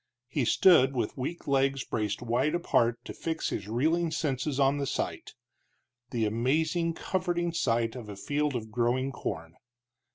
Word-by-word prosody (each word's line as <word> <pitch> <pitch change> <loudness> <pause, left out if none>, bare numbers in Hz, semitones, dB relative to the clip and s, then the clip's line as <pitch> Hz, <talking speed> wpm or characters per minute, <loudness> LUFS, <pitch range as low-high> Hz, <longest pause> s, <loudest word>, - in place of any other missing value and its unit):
He 130 0 -1
stood 135 0 +5
with 115 -4 -1
weak 140 +6 -5
legs 135 -1 +2
braced 105 0 -2
wide 125 +7 +1
apart 120 -9 +2
to - - -6
fix 160 -1 -2
his 100 - -4
reeling 160 +9 +1
senses 145 -3 -1
on 140 +1 +3
the 140 - -1
sight - - -3 0.7
the 115 -2 0
amazing, 155 +9 +1
comforting 175 -2 -1
sight, 115 -6 +1
of 115 -4 -8
a 100 - -6
field 145 +6 -1
of 110 -2 -4
growing 125 +3 +1
corn. 80 -9 -5
135 Hz, 155 wpm, -29 LUFS, 115-160 Hz, 0.7 s, stood